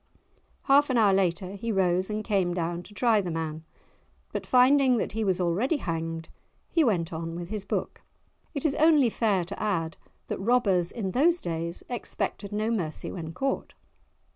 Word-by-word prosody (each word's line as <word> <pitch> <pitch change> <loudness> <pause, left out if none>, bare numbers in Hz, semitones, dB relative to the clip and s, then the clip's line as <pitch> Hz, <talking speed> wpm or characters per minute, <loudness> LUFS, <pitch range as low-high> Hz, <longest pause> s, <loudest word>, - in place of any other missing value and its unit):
Half 285 +1 +4
an 255 - +2
hour 210 -4 +5
later 185 -1 +1
he 215 +3 -4
rose 185 -1 +1
and 215 0 -2
came 190 -5 0
down 170 0 -2
to 200 - -14
try 225 -2 +3
the 180 - -4
man, 160 -1 -4 0.7
but - - -4
finding 255 0 +5
that - - -2
he 220 +2 -2
was 190 -3 +1
already 195 - +1
hanged 165 - -4 0.4
he 330 - +4
went 175 - 0
on 165 +1 -4
with 175 0 -6
his 215 -2 -4
book. - - -3 0.5
It 280 - -3
is 295 - +3
only 300 -6 +5
fair 200 -7 +1
to 200 +4 -7
add 165 -6 -1 0.3
that - - -4
robbers 195 -5 +2
in 200 -5 -3
those 330 - +3
days 170 0 -4
expected 225 -4 -4
no 215 +2 -1
mercy 170 -9 -3
when 160 -3 -6
caught. 270 +8 -2
195 Hz, 175 wpm, -27 LUFS, 170-240 Hz, 0.7 s, hour